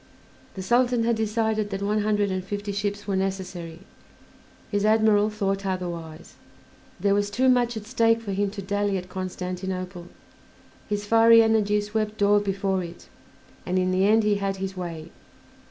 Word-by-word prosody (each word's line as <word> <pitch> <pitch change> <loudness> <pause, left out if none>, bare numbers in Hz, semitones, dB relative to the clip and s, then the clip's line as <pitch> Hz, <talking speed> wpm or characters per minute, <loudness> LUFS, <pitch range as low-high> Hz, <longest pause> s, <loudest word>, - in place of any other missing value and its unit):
The 190 - -5
Sultan 240 +3 +2
had 235 0 +2
decided 220 -1 0
that 195 0 -4
one 210 +1 +1
hundred 205 -1 +1
and 185 0 -2
fifty 205 +1 -4
ships 205 0 -3
were 200 - -1
necessary; 185 -3 -4 0.9
his 205 -1 0
admiral 215 -1 +4
thought 195 -2 -2
otherwise. 170 -4 -5 0.7
There 200 +2 +2
was 205 0 +1
too 250 +6 +1
much 245 -2 +3
at 210 - -7
stake 230 -1 +2
for 220 -3 -6
him 200 +1 0
to 200 0 -7
dally 205 0 0
at 185 0 -7
Constantinople; 185 -1 -5 0.8
his 205 0 -2
fiery 230 +1 +6
energy 215 -2 +2
swept 210 0 -2
all 205 +1 +5
before 195 -2 -1
it, 170 0 -11 0.5
and 185 +1 -1
in 185 0 +1
the 190 +2 +2
end 220 +1 +4
he 210 -1 +2
had 195 -1 -2
his 190 0 -5
way. 170 -3 -6
205 Hz, 165 wpm, -25 LUFS, 190-215 Hz, 0.9 s, fiery